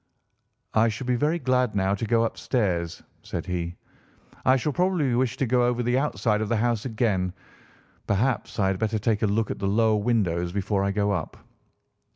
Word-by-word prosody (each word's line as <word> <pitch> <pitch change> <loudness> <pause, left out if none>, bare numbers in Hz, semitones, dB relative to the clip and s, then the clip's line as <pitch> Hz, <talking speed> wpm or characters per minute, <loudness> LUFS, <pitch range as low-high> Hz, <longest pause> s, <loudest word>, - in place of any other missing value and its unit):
"I 110 +1 +4
should 115 +4 -5
be 125 - +1
very 150 +6 +1
glad 125 -7 +1
now 95 0 +1
to 105 +3 -2
go 115 +1 +3
upstairs," 95 -8 -1 0.2
said - - -5
he. 85 -1 -3 0.7
"I 130 - +6
shall 140 +3 -1
probably 175 -7 +1
wish 125 +1 0
to 135 - +1
go 125 +1 +2
over 120 0 0
the 120 +2 +2
outside 105 -6 0
of 110 - -2
the 115 - +1
house 115 0 0
again. 105 -6 0 0.8
Perhaps 115 +6 0
I 95 -3 +2
had 95 -1 -1
better 110 0 0
take 105 0 0
a 110 - +3
look 110 +2 0
at - - -5
the 100 - -1
lower 110 +2 +3
windows 90 -7 0
before 100 0 0
I 100 - +1
go 100 +1 0
up." 90 -6 -3
110 Hz, 195 wpm, -25 LUFS, 100-125 Hz, 0.8 s, I